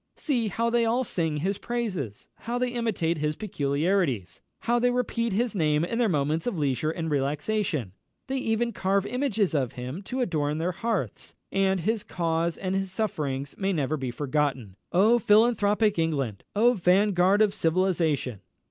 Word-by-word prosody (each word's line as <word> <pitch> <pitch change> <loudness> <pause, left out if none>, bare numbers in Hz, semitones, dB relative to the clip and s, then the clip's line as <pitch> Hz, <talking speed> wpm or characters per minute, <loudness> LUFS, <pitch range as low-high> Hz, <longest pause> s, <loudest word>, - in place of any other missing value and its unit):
See 245 -7 0
how 230 +4 0
they 235 0 +3
all 235 +3 +2
sing 160 -9 -1
his 190 +6 -1
praises! 190 - -4
how 235 +2 -4
they 250 0 0
imitate 215 -9 -1
his 150 0 -1
peculiarities! 145 - -1 0.2
how 240 +1 +2
they 245 +1 +3
repeat 235 -2 -1
his 225 +3 0
name 155 -4 +2
in 230 +6 -3
their 235 -3 +3
moments 155 +2 0
of 225 -7 -1
leisure 145 0 0
and 160 0 -3
relaxation! 150 - -1 0.3
They 270 0 -2
even 235 0 0
carve 195 +1 +1
images 225 -8 0
of 135 -6 0
him 125 +8 -6
to 255 +5 -3
adorn 150 -8 0
their 170 +3 0
hearths, 170 - -3 0.2
that 195 -1 +2
his 220 +4 0
cause 165 -1 -1
and 185 -1 -2
his 195 -1 -1
sufferings 145 -10 -2
may 195 0 +1
never 150 -2 0
be 135 -4 -3
forgotten! 135 -5 -1 0.2
Oh, 215 +7 +5
philanthropic 210 -2 +3
England! 140 -11 -1
oh, 235 +4 +5
vanguard 190 0 +3
of 205 -2 +1
civilisation!" 165 - 0
185 Hz, 165 wpm, -27 LUFS, 150-220 Hz, 0.3 s, Oh